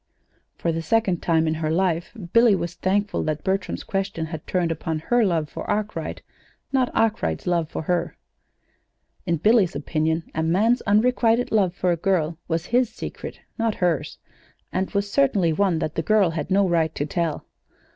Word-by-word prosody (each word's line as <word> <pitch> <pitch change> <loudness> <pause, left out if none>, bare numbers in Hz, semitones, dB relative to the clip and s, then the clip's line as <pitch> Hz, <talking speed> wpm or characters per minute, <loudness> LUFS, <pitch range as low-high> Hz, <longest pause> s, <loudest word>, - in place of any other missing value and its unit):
For 170 - -1
the 165 0 -2
second 200 -2 +1
time 160 -1 +2
in 155 - +1
her 160 -1 -2
life 170 0 0 0.2
Billy 230 -3 +6
was 175 -2 -3
thankful 200 +3 0
that 155 -1 -2
Bertram's 195 +1 -1
question 195 -4 -2
had 160 -1 -7
turned 175 -3 0
upon 160 0 -2
her 240 +10 +2
love 165 -6 +1
for - - -7
Arkwright, 210 0 -3 0.5
not 260 -2 +2
Arkwright's 80 - 0
love 170 -3 0
for - - -4
her. 175 +1 -1 1.1
In 170 -1 +1
Billy's 210 - +3
opinion, 160 +2 -1
a 160 - -1
man's 210 +10 +2
unrequited 230 +2 +3
love 190 -5 +2
for 180 -2 +1
a 170 - 0
girl 170 -3 0
was 165 0 -1
his 245 +1 +2
secret, - - -8 0.2
not 225 -1 +1
hers, 170 -6 -1 0.6
and 185 +1 -1
was 200 0 -2
certainly 200 - +2
one 190 -1 +2
that 155 -1 -2
the - - -1
girl 200 0 +3
had 165 - -4
no 195 0 +3
right 165 -3 +1
to 145 - -1
tell. 165 0 -2
180 Hz, 175 wpm, -23 LUFS, 160-205 Hz, 1.1 s, Billy